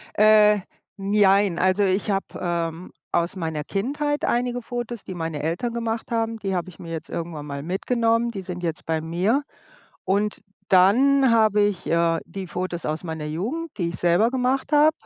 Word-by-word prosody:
Äh, 210 -1 +6 0.4
n 195 +1 -3
jein, 200 -3 +4
also 185 +2 +2
ich 190 +2 0
habe, 195 0 0
ähm, 170 0 -3 0.2
aus 170 +2 +1
meiner 160 -4 -3
Kindheit 290 +8 -2
einige 245 0 0
Fotos, 240 -2 -5
die 185 - -7
meine 160 -3 -4
Eltern 170 +10 -2
gemacht 230 0 -3
haben, 225 0 -1
die 195 -2 -2
habe 175 0 -2
ich 175 - -13
mir 165 -1 -8
jetzt 160 - -6
irgendwann 165 -3 -5
mal 140 -1 -5
mitgenommen, 230 +6 +1
die 195 -4 -6
sind 180 -1 -6
jetzt 165 -2 -4
bei 160 -1 0
mir. 180 - 0 0.6
Und 205 +2 0 0.3
dann 255 +8 +5
habe 215 -2 +4
ich, 205 -3 -1
äh, 165 0 +2
die 190 +2 -6
Fotos 180 -1 -4
aus 155 +3 -3
meiner 160 -2 -5
Jugend, 240 - -3
die 170 -3 0
ich 170 - -6
selber 175 +7 +3
gemacht 260 +3 0
habe. 300 +1 +6
195 Hz, 180 wpm, -24 LUFS, 170-230 Hz, 0.6 s, Äh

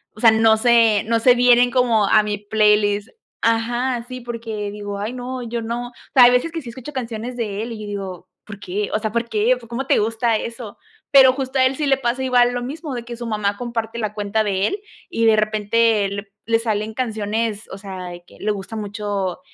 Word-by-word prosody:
o - - -13
sea, 225 -2 +7
no 220 0 +4
sé, 230 -2 +4
no 230 +1 +1
se 245 +2 +5
vienen 245 0 +5
como 235 -5 +3
a 215 - +5
mi 210 -1 -2
playlist. 210 0 +2 0.3
Ajá, 240 +2 0
sí, 255 0 -7
porque 225 -3 -5
digo: 205 -1 -6
“Ay, 210 +4 -3
no, 255 0 -5
yo 235 0 -4
no”. 235 +2 -4
O - - -22 0.2
sea, 255 - +8
hay 245 - +7
veces 250 +7 +1
que 330 0 -4
sí 250 - -9
escucho 260 +5 -9
canciones 240 -1 -5
de 210 -3 -3
él 235 - -6
y 225 - -7
yo 210 - -7
digo: 190 -3 -6 0.2
“¿Por 205 -2 -10
qué?”. 205 +1 -3
O 215 - +1
sea: 215 -1 -3
“¿Por 235 +1 -2
qué?, 225 +3 +2
¿cómo 245 +4 -4
te - - +3
gusta 225 +1 +1
eso?”. 230 -2 -7 0.3
Pero 265 -2 +8
justo 265 0 -3
a 260 - +5
él 260 +1 +1
sí 295 +1 -1
le 270 - +3
pasa 255 0 -1
igual 245 -1 +3
lo 245 - -2
mismo 290 +2 -6
de 240 - -5
que 235 0 -8
su 240 - -6
mamá 210 -2 -1
comparte 235 -1 -4
la 215 -2 -2
cuenta 210 +1 -1
de 195 -1 +1
él 405 +1 -4 0.3
y 230 -10 0
de 220 -1 +6
repente 215 0 +2
le 200 0 -5
p 200 - -34
le 225 0 +2
salen 220 -1 -2
canciones, 220 -2 -2
o 190 - -6
sea, 190 -2 -7
de 175 0 -10
que - - -18
le 210 - 0
gusta 200 +2 -6
mucho 205 -3 -3
225 Hz, 235 wpm, -21 LUFS, 210-245 Hz, 0.3 s, sea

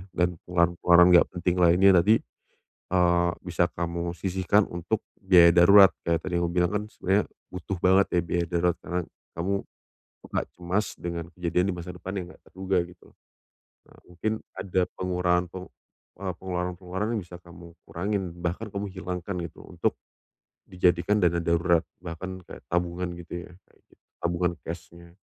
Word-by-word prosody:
dan 90 0 +1
pengeluaran-pengeluaran 85 0 +4
nggak 85 - +7
penting 90 +1 0
lainnya 90 +3 +6
tadi, 105 +6 +5 0.8
eee, 85 -1 +3
bisa 90 -1 +1
kamu 85 0 -3
sisihkan 95 +2 +2
untuk 85 +5 -2 0.2
biaya 90 -3 +7
darurat 95 +1 +8
kayak 85 -1 +1
tadi 90 -2 -3
yang 85 - +1
kamu 85 - -5
bilang 90 +1 +2
kan 105 - 0
sebenarnya 95 +3 +1 0.3
butuh 95 0 -4
banget 95 +2 +4
ya - - +1
biaya 85 +1 0
darurat 85 0 +2
karena 90 +1 -2 0.4
kamu, 90 +4 -1 0.8
agak - - -1
cemas 90 +4 -1
dengan 85 -1 -4
kejadian 90 0 0
di - - -3
masa 90 +1 -7
depan 95 +1 -7
yang 90 - -5
enggak - - -19
terduga 95 0 -1
gitu. 90 0 -18 0.8
Nah - - -20
mungkin 90 +5 -3 0.3
ada 95 -1 0 0.2
pengurangan 90 -1 +1
p - - -26 0.6
eee, 95 -2 -3
pengeluaran-pengeluaran 90 +2 -3
yang 105 - -2
bisa 90 0 -11
kamu 85 -1 -14
kurangin 100 +3 -2 0.2
bahkan 90 +6 -2
kamu 100 +1 -2
hilangkan 90 0 -5
gitu - - -10
untuk, - - -1 0.7
dijadikan 90 +2 +2
dana 85 -2 +2
darurat 85 0 +2 0.2
bahkan 95 +2 -7
kayak - - -11
tabungan 90 +1 -1
gitu 85 0 -7
ya, - - -19 0.2
kayak - - -29
gitu - - -26 0.2
tabungan 85 0 0
cash-nya. 85 +1 -9
90 Hz, 155 wpm, -26 LUFS, 85-95 Hz, 0.8 s, darurat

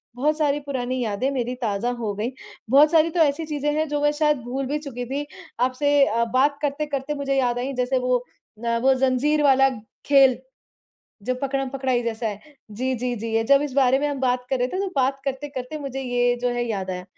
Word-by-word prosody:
बहुत 300 +5 +1
सारी 295 -1 +1
पुरानी 255 -2 -3
यादें 220 +5 -1
मेरी 250 -2 -2
ताज़ा 220 +1 -1
हो 225 -4 -3
गई, 225 +5 -2 0.4
बहुत 290 +4 +6
सारी 330 0 +4
तो 345 - -2
ऐसी 305 +2 +2
चीज़ें 295 -1 -1
हैं 315 0 +1
जो 295 0 -1
मैं 295 0 +3
शायद 300 -2 +3
भूल 260 +3 -3
भी 290 +3 -1
चुकी 255 -5 -6
थी, 275 +4 -3 0.3
आपसे 255 +3 +1 0.2
अ, 235 -2 +1
बात 280 +3 +3
करते-करते 290 -1 -2
मुझे 275 -1 -1
याद 245 -2 +1
आई 265 +2 -3
जैसे 250 +1 +1
वो 250 0 +2 0.5
अ, 235 0 +1
वो 265 +2 +4
ज़ंज़ीर 265 +3 +2
वाला 270 -1 +5 0.4
खेल। 270 -3 +5 0.9
जब 255 +4 -2
पकड़म-पकड़ाई 270 -2 -1
जैसा 230 0 -3
है 205 -1 -6 0.3
जी, 255 +5 -2
जी, 250 0 -2
जी। 230 +1 -5
ये 225 - +2
जब 280 +4 +5
इस 290 - -4
बारे 265 -1 +4
में 295 +1 0
हम 285 -2 -4
बात 250 -1 0
कर 265 - +1
रहे 250 +1 0
थे 370 - -3
तो 395 - -1
बात 270 +1 +1
करते-करते 275 +1 -4
मुझे 270 -2 -5
ये 245 -1 +1
जो 250 - +2
है 240 0 -1
याद 190 -3 -3
आया 180 0 -5
265 Hz, 215 wpm, -23 LUFS, 245-285 Hz, 0.9 s, बहुत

